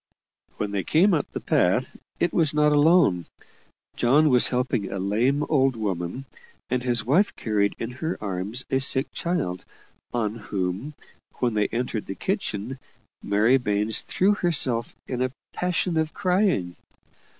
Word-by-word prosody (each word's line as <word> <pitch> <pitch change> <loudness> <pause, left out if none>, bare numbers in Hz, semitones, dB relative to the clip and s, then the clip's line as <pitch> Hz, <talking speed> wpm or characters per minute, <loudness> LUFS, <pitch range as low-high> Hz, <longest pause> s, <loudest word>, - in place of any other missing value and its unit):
When 105 -1 -3
they 100 -2 -1
came 180 - +3
up 150 - -1
the - - -4
path, - - +1 0.2
it 175 - +1
was 155 -3 +2
not 150 0 +4
alone 145 - +4 0.7
John 145 +6 +4
was 125 -1 +4
helping 125 -4 -1
a - - -3
lame 115 +10 +1
old 135 -4 +2
woman, 100 +3 -3 0.5
and 125 -1 +1
his 120 -3 0
wife 170 - +2
carried 105 -2 0
in 115 - -5
her 160 +7 -4
arms 100 +5 -3
a 130 - +2
sick 135 0 +3
child, 160 - -2 0.5
on 110 -3 -1
whom, 100 +5 -4 0.4
when 120 -2 0
they 105 -1 +1
entered 115 -2 -3
the 95 - -5
kitchen, 130 - -3 0.4
Mary 105 +6 +3
Baines 105 -2 0
threw 195 +3 +1
herself 140 - 0
in 125 -1 -3
a 130 - +1 0.2
passion 180 -1 -1
of 160 -1 -1
crying. 180 - +1
125 Hz, 150 wpm, -25 LUFS, 105-150 Hz, 0.7 s, not